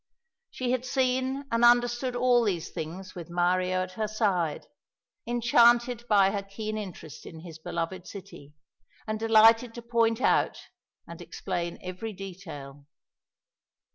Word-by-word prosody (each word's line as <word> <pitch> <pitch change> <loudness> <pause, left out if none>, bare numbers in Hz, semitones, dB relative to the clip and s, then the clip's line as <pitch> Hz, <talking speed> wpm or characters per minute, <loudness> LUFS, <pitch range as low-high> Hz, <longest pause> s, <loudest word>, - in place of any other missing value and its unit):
She 250 -1 -3
had 255 -1 0
seen 260 +1 0
and 230 +1 +1
understood 240 +1 +3
all 245 -1 +3
these 185 -7 -2
things 180 +4 -7
with 175 -2 -9
Mario 180 +1 +1
at 185 - -7
her 215 +3 -2
side, 195 -8 0 0.6
enchanted 240 0 +3
by 200 -3 +4
her 200 -1 -2
keen 215 +2 -6
interest 185 -7 -8
in 160 -1 -10
his 165 -2 -10
beloved 170 +3 -4
city, 185 -7 -11 0.5
and 215 0 -3
delighted 225 +1 +5
to 235 - -8
point 230 -1 +1
out 260 - +2 0.5
and - - -10
explain 170 0 -4
every 185 +5 -6
detail. 160 -8 -9
215 Hz, 135 wpm, -28 LUFS, 180-240 Hz, 0.6 s, delighted